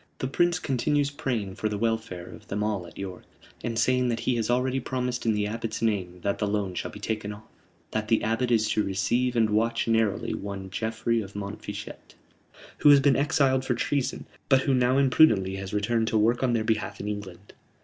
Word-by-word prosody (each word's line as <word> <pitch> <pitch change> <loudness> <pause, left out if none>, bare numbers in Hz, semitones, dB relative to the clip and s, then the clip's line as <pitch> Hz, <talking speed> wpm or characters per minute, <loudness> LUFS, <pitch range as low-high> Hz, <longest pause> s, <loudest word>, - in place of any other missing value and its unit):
"The - - -3
Prince 175 +6 +2
continues 145 0 0
praying 125 -10 -3
for 110 - -1
the 105 - -2
welfare 110 -5 -2
of - - -12
them 105 +1 -2
all 105 -5 -2
at - - -15
York, 95 -2 -6 0.4
and 115 -1 -2
saying 125 +1 +2
that 115 -1 -1
he 125 - +1
has 115 -1 -1
already 130 +2 +1
promised 125 -2 -3
in 110 - +4
the 105 -1 0
Abbot's 110 +1 -3
name 95 -6 -1
that 100 0 -1
the 105 - 0
loan 100 -2 -1
shall - - -4
be 105 - -10
taken 105 0 -3
off; 105 +1 -10 0.5
that 110 0 -2
the 115 0 +2
Abbot 115 +3 0
is 110 -2 +3
to 105 - +2
receive 110 +6 0
and 110 -2 +3
watch 115 +3 +1
narrowly 115 -3 +1
one 100 -1 -6
Geoffrey 115 +2 -1
of 100 -1 -9
Montfichet, 105 +1 -7 0.6
who 150 - +6
has 145 -1 +8
been 135 0 +4
exiled 135 -1 +2
for 125 -2 0
treason, 135 +2 -1 0.2
but 135 -2 +5
who 135 - +1
now 125 +1 +3
imprudently 120 -9 +4
has 95 0 -6
returned 110 +2 0
to 110 - +1
work 115 +3 +2
on 130 -2 +2
their 115 -2 +1
behalf 110 -1 -1
in 105 - -5
England." 105 -2 -7
110 Hz, 210 wpm, -27 LUFS, 105-125 Hz, 0.6 s, has